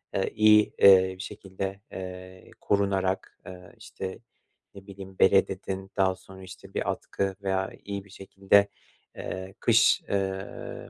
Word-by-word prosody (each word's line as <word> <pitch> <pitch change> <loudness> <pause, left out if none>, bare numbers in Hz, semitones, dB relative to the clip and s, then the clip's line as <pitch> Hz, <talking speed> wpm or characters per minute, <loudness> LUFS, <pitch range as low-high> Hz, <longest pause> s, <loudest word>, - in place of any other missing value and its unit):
eee, 95 - 0
iyi, 105 -1 +5
eee, 95 -1 +7
bir - - -23
şekilde, 95 +1 -6
eee, 95 0 -9
korunarak, 95 -2 -1
eee, 90 -1 -11
işte, 95 -1 -7 0.6
ne 100 0 -13
bileyim, 95 -1 -11
bere, 95 +1 +5
dedin. 95 0 -6
Daha 95 -1 +2
sonra, 95 0 -14
işte, 95 +1 -12
bir - - -2
atkı 95 -1 -3
veya 95 0 -1
iyi 100 -1 -5
bir - - -19
şekilde, 95 +1 +2 0.5
eee, 95 +1 -7
kış, - - +4
eee, 95 -1 -4
95 Hz, 140 wpm, -27 LUFS, 95-100 Hz, 0.6 s, eee